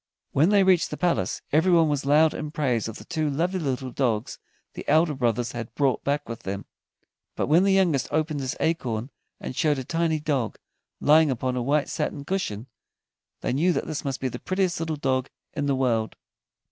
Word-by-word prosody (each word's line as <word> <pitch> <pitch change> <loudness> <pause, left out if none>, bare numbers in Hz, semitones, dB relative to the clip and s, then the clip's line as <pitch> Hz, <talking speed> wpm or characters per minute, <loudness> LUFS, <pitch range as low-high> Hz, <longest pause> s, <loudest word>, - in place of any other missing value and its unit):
When 155 +6 +3
they 205 -1 +5
reached 185 -3 +3
the - - -5
palace, 175 -2 0
everyone 165 +1 +4
was 145 -2 -1
loud 155 +2 +5
in 150 - -4
praise 130 -8 0
of 110 - -7
the - - -12
two 155 -3 -1
lovely 175 +6 0
little 130 -4 -2
dogs 120 -4 -1 0.3
the - - -7
elder 155 +1 +4
brothers 120 -2 0
had 115 -2 -7
brought 140 -3 +1
back 145 +1 -1
with 115 -1 -6
them, 100 +1 -5 0.7
but - - 0
when 160 +6 +4
the 200 - +3
youngest 175 -8 +2
opened 155 -1 -1
his 130 -1 -3
acorn 130 -6 -1 0.3
and - - -6
showed 150 0 +2
a 130 - -3
tiny 165 +2 0
dog, 140 -7 -1 0.4
lying 155 +1 +5
upon 130 0 -1
a 125 - -1
white 145 +4 +1
satin 140 - -3
cushion, 125 - -2 0.8
they - - -1
knew 170 +7 +2
that - - -2
this 155 -2 -4
must 135 -3 -3
be 130 - -1
the 125 - -5
prettiest 185 -2 -1
little 160 -1 -2
dog 130 -2 -1 0.2
in 145 - -2
the 140 - +2
world. 115 -4 0
145 Hz, 195 wpm, -25 LUFS, 130-160 Hz, 0.8 s, they